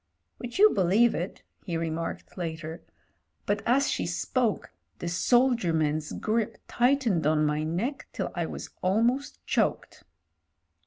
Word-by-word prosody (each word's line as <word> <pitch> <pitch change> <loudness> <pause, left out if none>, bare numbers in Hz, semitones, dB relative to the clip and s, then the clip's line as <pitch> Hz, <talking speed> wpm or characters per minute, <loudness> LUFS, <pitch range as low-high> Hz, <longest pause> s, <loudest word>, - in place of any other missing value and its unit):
"Would 245 +2 -6
you 425 +2 +7
believe 200 +6 +4
it," 175 +3 -4 0.2
he 170 -4 -2
remarked 165 0 -4
later, 165 -1 -5 0.6
"but 205 - 0
as 270 +4 +3
she - - -1
spoke 240 -6 -1 0.3
the 170 - -5
soldier 235 +1 +3
man's 155 -1 0
grip 220 0 -1
tightened 240 - +2
on 155 0 +3
my 150 0 0
neck 205 - -2
till - - -3
I - - -2
was - - -7
almost 230 +9 0
choked." - - -1
190 Hz, 135 wpm, -28 LUFS, 165-240 Hz, 0.6 s, you